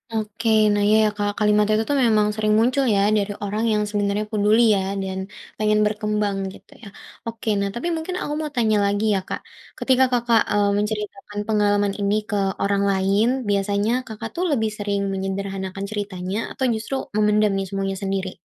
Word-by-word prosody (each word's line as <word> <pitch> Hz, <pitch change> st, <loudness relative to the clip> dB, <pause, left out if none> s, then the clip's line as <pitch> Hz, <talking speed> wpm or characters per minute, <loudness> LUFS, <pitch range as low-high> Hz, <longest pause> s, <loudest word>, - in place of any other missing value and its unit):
Oke, 220 Hz, +1 st, -3 dB, 0.2 s
nah 205 Hz, 0 st, +1 dB
iya 215 Hz, +1 st, +5 dB
ya, 215 Hz, -, +3 dB
Kak, 205 Hz, 0 st, 0 dB
kalimat 210 Hz, 0 st, +3 dB
itu 215 Hz, +1 st, +2 dB
tuh 285 Hz, -, +2 dB
memang 215 Hz, -2 st, +3 dB
sering 215 Hz, -1 st, +1 dB
muncul 255 Hz, +4 st, +2 dB
ya -, -, +3 dB, 0.2 s
dari 205 Hz, 0 st, -1 dB
orang 210 Hz, +2 st, -2 dB
yang 210 Hz, 0 st, +1 dB
sebenarnya 205 Hz, 0 st, 0 dB
peduli 215 Hz, +1 st, +3 dB
ya 195 Hz, -, 0 dB, 0.2 s
dan 190 Hz, 0 st, -4 dB, 0.4 s
pengen 215 Hz, 0 st, +2 dB
berkembang 210 Hz, -1 st, -1 dB, 0.2 s
gitu -, -, -17 dB
ya. -, -, -9 dB, 0.4 s
Oke, 230 Hz, 0 st, -7 dB
nah 200 Hz, 0 st, 0 dB
tapi 240 Hz, +8 st, -3 dB
mungkin 325 Hz, +3 st, -4 dB
aku 295 Hz, -, -3 dB
mau 305 Hz, -1 st, -4 dB
tanya 220 Hz, -3 st, +2 dB
lagi 205 Hz, +2 st, 0 dB
ya, -, -, +1 dB
Kak, -, -, -4 dB, 0.4 s
ketika 260 Hz, 0 st, +3 dB
Kakak, 240 Hz, -2 st, +3 dB
eee, 205 Hz, -1 st, +2 dB
menceritakan 210 Hz, -1 st, -4 dB
pengalaman 205 Hz, -2 st, +2 dB
ini 200 Hz, 0 st, +1 dB
ke 210 Hz, -, -1 dB, 0.3 s
orang 200 Hz, 0 st, +1 dB
lain, 195 Hz, +3 st, +2 dB, 0.2 s
biasanya 200 Hz, +2 st, +1 dB, 0.2 s
Kakak 220 Hz, +1 st, -6 dB
tuh 355 Hz, -, -1 dB
lebih 220 Hz, -6 st, +1 dB
sering 200 Hz, -1 st, -1 dB
menyederhanakan 195 Hz, 0 st, -4 dB
ceritanya, 200 Hz, -2 st, -4 dB
atau -, -, -5 dB
justru 225 Hz, +5 st, -4 dB, 0.2 s
memendam 210 Hz, 0 st, +3 dB
nih 195 Hz, -, -1 dB
semuanya 195 Hz, 0 st, -2 dB
sendiri? 195 Hz, -1 st, -3 dB
210 Hz, 180 wpm, -22 LUFS, 200-220 Hz, 0.4 s, iya